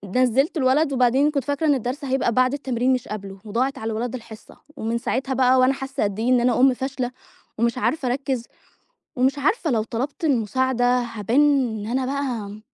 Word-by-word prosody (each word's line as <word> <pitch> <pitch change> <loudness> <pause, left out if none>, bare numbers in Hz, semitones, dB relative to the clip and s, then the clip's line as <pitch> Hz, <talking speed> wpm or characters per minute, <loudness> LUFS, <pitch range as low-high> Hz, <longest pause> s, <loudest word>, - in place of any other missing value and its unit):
نزِّلت 255 +5 +2
الولد 280 +2 +2
وبعدين 260 +3 +3
كنت 280 -3 -1
فاكرة 285 +4 -1
إن 295 - +5
الدرس 260 +3 -4
هيبقى 265 -2 +1
بعد 255 +2 +2
التمرين 260 -2 0
مش 255 - -2
قبلُه، 195 -2 -7
وضاعت 255 +6 -1
على 225 -2 -4
الولد 235 +3 -3
الحصة، 220 -3 -11 0.2
ومن 225 +2 -2
ساعتها 265 +3 -2
بقى 260 0 +4
وأنا 255 +1 +4
حاسة 270 0 -3
قد 205 0 -2
إيه 235 +3 0
إن 250 -1 +4
أنا 245 -1 +2
أم 260 0 +5
فاشلة، 260 -1 -3 0.5
ومش 235 +2 0
عارفة 265 +1 0
أركِّز، 260 -1 -2 0.7
ومش 265 +3 +2
عارفة 320 - +1
لو 225 -4 +1
طلبت 255 +8 -4
المساعدة 260 -1 +1 0.2
هابان 230 +1 0 0.4
إن 205 - -6
أنا 255 +3 -1
بقى 245 -7 -3
255 Hz, 185 wpm, -23 LUFS, 235-270 Hz, 0.7 s, إن